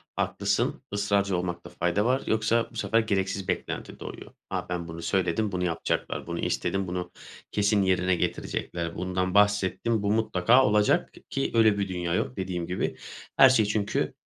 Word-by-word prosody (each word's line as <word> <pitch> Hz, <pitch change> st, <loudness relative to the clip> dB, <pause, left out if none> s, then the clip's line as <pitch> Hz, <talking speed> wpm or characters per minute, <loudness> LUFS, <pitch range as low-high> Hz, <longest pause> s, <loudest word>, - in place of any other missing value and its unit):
Haklısın, -, -, -1 dB
ısrarcı 100 Hz, -2 st, +1 dB
olmakta 90 Hz, -1 st, -4 dB
fayda 90 Hz, +4 st, 0 dB
var, 130 Hz, +3 st, +1 dB
yoksa 110 Hz, +1 st, +1 dB
bu -, -, -16 dB
sefer 115 Hz, -, +1 dB
gereksiz 95 Hz, -3 st, -1 dB
beklenti -, -, -4 dB
doğuyor. -, -, -9 dB, 0.2 s
A, -, -, -3 dB
ben 90 Hz, -1 st, -3 dB
bunu 85 Hz, 0 st, -7 dB
söyledim, 95 Hz, +3 st, 0 dB
bunu 90 Hz, -1 st, -2 dB
yapacaklar; 85 Hz, -2 st, -2 dB
bunu -, -, -4 dB
istedim, 95 Hz, -1 st, -1 dB
bunu 90 Hz, 0 st, -4 dB, 0.4 s
kesin 105 Hz, 0 st, +2 dB
yerine 95 Hz, -1 st, +2 dB
getirecekler; 85 Hz, -1 st, -3 dB
bundan 90 Hz, 0 st, -1 dB
bahsettim, 105 Hz, +1 st, +2 dB
bu 100 Hz, -, +1 dB
mutlaka 115 Hz, +3 st, +4 dB
olacak 105 Hz, 0 st, +2 dB
k -, -, -16 dB
ki 135 Hz, -, -1 dB
böyle 110 Hz, -3 st, +4 dB
bir 100 Hz, -1 st, -1 dB
dünya 90 Hz, -2 st, -2 dB
yok 105 Hz, -, -1 dB
dediğim 90 Hz, -3 st, -3 dB
gibi. 90 Hz, -, -2 dB, 0.4 s
Her 135 Hz, -1 st, +9 dB
şey 115 Hz, -4 st, +4 dB
çünkü 105 Hz, 0 st, -1 dB
95 Hz, 165 wpm, -27 LUFS, 90-105 Hz, 0.4 s, Her